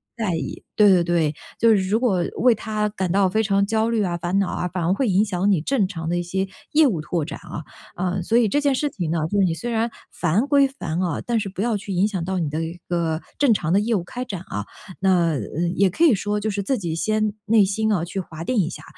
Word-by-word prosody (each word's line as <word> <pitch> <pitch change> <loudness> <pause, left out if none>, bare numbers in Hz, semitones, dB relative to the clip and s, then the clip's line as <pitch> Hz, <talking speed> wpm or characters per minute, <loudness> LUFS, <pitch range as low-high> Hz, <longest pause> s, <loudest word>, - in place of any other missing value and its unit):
在 215 -7 -1
意。 145 -5 -5
对 210 -1 +6
对 180 -3 +5
对， 170 -3 +1 0.3
就 230 - +5
是 220 - +6
如 220 +3 +2
果 195 -8 +1
为 245 -2 +4
它 215 0 -2
感 190 -4 -3
到 195 0 +3
非 220 +4 +1
常 200 -1 +2
焦 220 +2 +1
虑 225 -2 +1
啊、 175 -3 -1
烦 175 +3 -1
恼 195 - +1
啊， 180 - -2
反 180 0 -3
而 170 +3 +2
会 255 +6 0
影 195 +3 +3
响 195 0 +1
你 175 -6 +2
正 215 - +1
常 165 -4 -5
的 175 - 0
一 175 - -1
些 190 +2 -2 0.3
业 305 -1 +6
务 175 -10 -1
拓 155 +1 -2
展 160 - -7
啊。 160 - -7 0.3
啊， 185 +1 -1
所 225 +7 +1
以 235 - +4
这 290 +8 +1
件 285 -1 +2
事 295 +3 0
情 175 - -4
呢， 170 - 0
就 205 - +1
是 195 - +5
你 170 - +1
虽 240 +9 -4
然 230 +1 0 0.2
烦 185 - 0
归 280 -1 +5
烦 180 -11 -4
啊， 175 -5 -1
但 235 -2 +1
是 200 -2 -3
不 190 +1 -5
要 230 -2 +1
去 200 0 -7
影 185 +3 +3
响 190 -5 -3
到 190 +1 -2
你 160 -4 -1
的 155 +2 -2
一 165 +2 -6
个 165 -2 -1 0.2
正 280 -5 +5
常 170 -5 -1
的 195 - +5
业 225 +3 0
务 180 - -1
开 245 +8 -5
展 195 -7 -5
啊。 105 - -5 0.3
那， 180 -3 +3
呃， 160 +5 -2
也 195 +1 +4
可 320 - 0
以 305 -9 +6
说 205 +2 -2
就 215 +1 -2
是 200 0 -2
自 260 +7 0
己 170 -5 -3
先 215 +5 0
内 215 -1 +5
心 220 +3 0
啊 180 -6 +1
去 185 +3 -4
划 165 -3 -7
定 250 +8 -1
一 175 -6 +2
下， - - -9
195 Hz, 295 characters per minute, -22 LUFS, 175-220 Hz, 0.3 s, 对